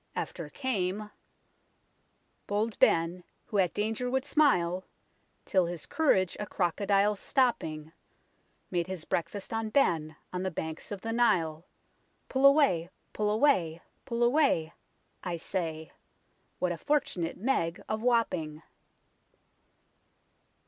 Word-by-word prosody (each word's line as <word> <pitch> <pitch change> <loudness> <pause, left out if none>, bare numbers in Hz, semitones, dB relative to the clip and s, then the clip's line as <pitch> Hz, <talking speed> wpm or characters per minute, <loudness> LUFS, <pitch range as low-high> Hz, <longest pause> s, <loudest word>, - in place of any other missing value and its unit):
After - - -4
came 210 -5 -2 0.7
"... - - -43
bold 210 +2 -1
Ben, 165 +2 +3 0.2
who 205 - -1
at 180 -3 +3
danger 225 +4 -1
would 265 +1 0
smile, 185 - +2 0.6
'Till 185 -3 +2
his 170 -2 -5
courage 190 - +2
a 210 - -3
crocodile 200 +3 +1
stopping, 160 - 0 0.8
Made 175 -1 0
his 185 -4 -6
breakfast 195 +5 -3
on 225 -1 -1
Ben 165 - +1 0.2
on 180 - -2
the 190 - -1
banks 160 0 -6
of 200 -2 -5
the 225 0 -3
Nile, 175 -9 +2 0.6
Pull 270 +1 +5
away, 275 - +4 0.2
pull 210 0 0
away, 210 - +2 0.2
pull 240 -2 -1
away; 240 - +3 0.5
I 175 -2 -3
say; 160 -3 -4 0.7
What 180 -1 0
a 170 - -4
fortunate 185 - -1
Meg 180 -7 0
of 215 0 -2
Wapping." 180 -11 0
190 Hz, 120 wpm, -29 LUFS, 170-235 Hz, 0.8 s, Pull